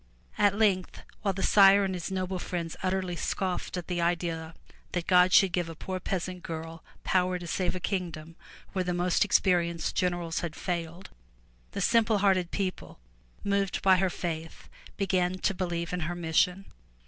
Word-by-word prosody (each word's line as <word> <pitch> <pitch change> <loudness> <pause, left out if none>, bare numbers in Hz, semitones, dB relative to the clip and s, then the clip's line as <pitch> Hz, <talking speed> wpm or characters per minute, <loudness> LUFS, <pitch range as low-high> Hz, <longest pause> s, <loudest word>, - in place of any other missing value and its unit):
At 205 -1 +4
length 195 -4 +1 0.2
while 195 -2 0
the 190 - -3
Sire 200 0 +7
and 190 - -2
his 180 -1 -4
noble 185 -1 -2
friends 170 -2 -4
utterly 185 -1 -1
scoffed 185 +1 -2
at 175 - -4
the 175 -1 -2
idea 170 -1 -1 0.4
that 175 -2 -1
God 180 0 +5
should 195 -1 +6
give 175 -2 -1
a 165 - -7
poor 185 +3 -5
peasant 180 0 -3
girl 165 0 -7 0.2
power 185 -1 +1
to 175 - -8
save 175 +1 -1
a - - -3
kingdom 170 -4 -4 0.4
where 190 -1 0
the 180 -1 -2
most 175 0 +2
experienced 175 -4 +1
generals 175 -2 0
had 165 -2 -4
failed, 175 0 -4 0.6
the - - -3
simple 225 +1 +3
hearted 190 -3 +2
people, 190 -1 -4 0.4
moved 200 -1 0
by 190 -1 +6
her 190 0 +2
faith, 165 -2 -5 0.3
began 185 -2 +1
to 195 - 0
believe 175 -2 -3
in 180 - -1
her 175 +1 -3
mission. 175 +3 +1
180 Hz, 170 wpm, -28 LUFS, 170-190 Hz, 0.6 s, Sire